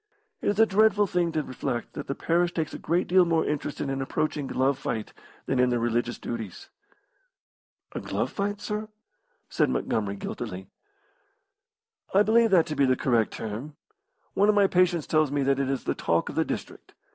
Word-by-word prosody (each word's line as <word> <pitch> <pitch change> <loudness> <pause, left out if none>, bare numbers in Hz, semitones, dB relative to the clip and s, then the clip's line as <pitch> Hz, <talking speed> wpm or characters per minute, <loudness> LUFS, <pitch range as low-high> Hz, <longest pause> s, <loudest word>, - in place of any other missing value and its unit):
It - - 0
is 205 +1 0
a 225 - +8
dreadful 210 0 +4
thing 175 -3 0
to 155 -1 0
reflect 120 -3 -4
that 145 - -6
the 140 - -2
parish 170 +1 +1
takes 160 -2 -2
a - - -6
great 170 +3 0
deal 185 +1 +5
more 165 -2 +1
interest 150 -1 -3
in 140 - -2
an 135 0 -2
approaching 145 +1 -2
glove 135 +1 +1
fight 110 -4 -4 0.3
than 130 - 0
in 125 0 +4
their 120 - +1
religious 120 +1 -1
duties." 110 -6 -6 1.2
"A - - -4
glove - - -2
fight, 205 0 -2
sir?" 210 +1 -3 0.6
said - - +1
Montgomery, 100 -2 -1
guiltily. 95 -1 -6 1.4
"I 200 - +7
believe 230 +2 +4
that 180 -5 +5
to 155 - -4
be 140 -1 +3
the 130 - +3
correct 120 -4 +1
term. 115 +8 -6 0.6
One 205 +1 +3
of 210 - +4
my 205 -1 +5
patients 180 -4 +2
tells 155 -3 +2
me 145 -1 0
that 135 0 +2
it 135 -1 0
is 135 -1 -2
the - - 0
talk 85 0 0
of - - -7
the - - +2
district. - - -7
150 Hz, 190 wpm, -26 LUFS, 125-180 Hz, 1.4 s, a